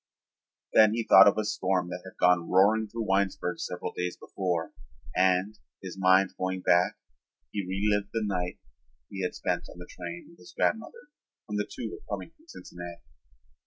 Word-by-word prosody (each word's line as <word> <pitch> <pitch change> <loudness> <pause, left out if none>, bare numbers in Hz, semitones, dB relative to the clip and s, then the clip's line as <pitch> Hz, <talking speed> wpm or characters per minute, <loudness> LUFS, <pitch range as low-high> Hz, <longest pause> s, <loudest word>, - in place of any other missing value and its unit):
Then 110 0 +6
he 115 - -1
thought 95 -2 +8
of 100 - +4
a 110 - +1
storm 95 -4 0
that 90 0 -6
had 95 - -12
gone 90 -1 +3
roaring 105 +4 +4
through 115 +2 -4
Winesburg 95 -2 0
several 90 0 -4
days 90 0 -3
before 90 -4 -3 0.4
and, 95 +3 +2 0.2
his 95 -2 -7
mind 95 0 +4
going 95 0 -2
back, 90 0 +3 0.5
he 100 - -2
relived 100 +2 0
the 115 -1 -1
night 90 -3 -2 0.5
he 95 - -5
had 90 - -2
spent - - -2
on - - -12
the 90 - -9
train 85 -1 -8
with 170 - -19
his 170 - -15
grandmother 295 - -1 0.4
when 105 - -4
the 105 0 -2
two 110 - -5
were - - -12
coming 95 +11 -10
from 320 - -27
Cincinnati. 85 - -10
95 Hz, 175 wpm, -28 LUFS, 90-105 Hz, 0.5 s, thought